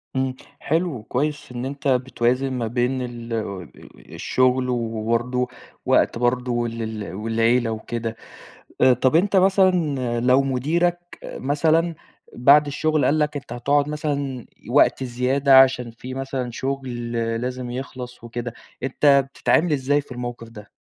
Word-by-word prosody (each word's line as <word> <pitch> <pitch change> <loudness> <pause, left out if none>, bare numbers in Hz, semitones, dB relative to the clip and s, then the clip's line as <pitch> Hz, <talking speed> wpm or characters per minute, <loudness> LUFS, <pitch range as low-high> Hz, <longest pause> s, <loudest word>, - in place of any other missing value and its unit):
امم. 130 -1 -1 0.2
حلو 160 -6 -1
كويس 145 +4 -2
إن 125 0 -5
أنت 140 +1 -5
بتوازن 130 0 +1
ما 120 -3 -2
بين 125 +3 0
ال 120 -1 -6 0.8
الشغل 130 0 +1
وبرضه 115 +1 -1 0.4
وقت - - +3
برضه 120 0 0
ال 115 0 -5 0.2
ال 85 - -8
والعيلة 115 +3 +1
وكده، 115 +1 -4 0.7
آآ، 130 - +7
طَب 130 +4 +1
أنت 195 +4 +3
مثلًا 190 0 +5 0.5
لو 125 +3 +4
مديرك 160 +7 0 0.2
مثلًا 160 +4 0 0.4
بعد 140 +4 +5
الشغل 155 +1 0
قال 155 - +2
لك 150 0 0
أنت 140 -4 -6
هتقعد 140 +4 +1
مثلًا 140 -4 -3 0.2
وقت - - +3
زيادة 130 +2 +4
عشان 125 -3 +1
في 125 +3 -9
مثلًا 135 -2 -4
شغل 125 -2 -4 0.3
لازم 125 0 -4
يخلص 125 -1 -7
وكده، 120 0 -5 0.3
أنت 140 +1 +3
بتتعامل 160 +3 +2
إزاي 145 +1 +1
في 140 - -20
الموقف 120 -2 -6
ده؟ 105 -2 -13
130 Hz, 130 wpm, -22 LUFS, 120-140 Hz, 0.8 s, آآ